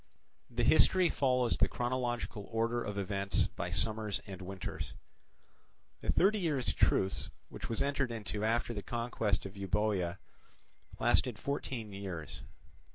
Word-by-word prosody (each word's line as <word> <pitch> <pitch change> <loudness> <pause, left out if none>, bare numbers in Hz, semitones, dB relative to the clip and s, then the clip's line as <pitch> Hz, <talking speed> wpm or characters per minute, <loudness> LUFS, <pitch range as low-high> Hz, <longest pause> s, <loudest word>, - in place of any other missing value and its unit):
The 120 -1 -1
history 175 +7 +5
follows 125 -3 +2
the - - +5
chronological 120 -4 -2
order 115 +1 +1
of 105 -1 -4
events 100 0 +1
by - - -4
summers 110 -2 0
and 95 -3 -8
winters. 95 0 -5 1.0
The - - 0
thirty 205 +3 +4
years' 150 -8 +1
truce 95 0 +2 0.2
which - - -7
was 115 - +1
entered 140 -3 0
into 110 -2 -3
after 115 +2 +1
the 105 - -4
conquest 115 -4 -1
of 95 0 -7
Euboea 100 -2 0 0.8
lasted - - +3
fourteen 125 -6 -3
years. 95 -6 -6
115 Hz, 130 wpm, -33 LUFS, 100-125 Hz, 1.0 s, history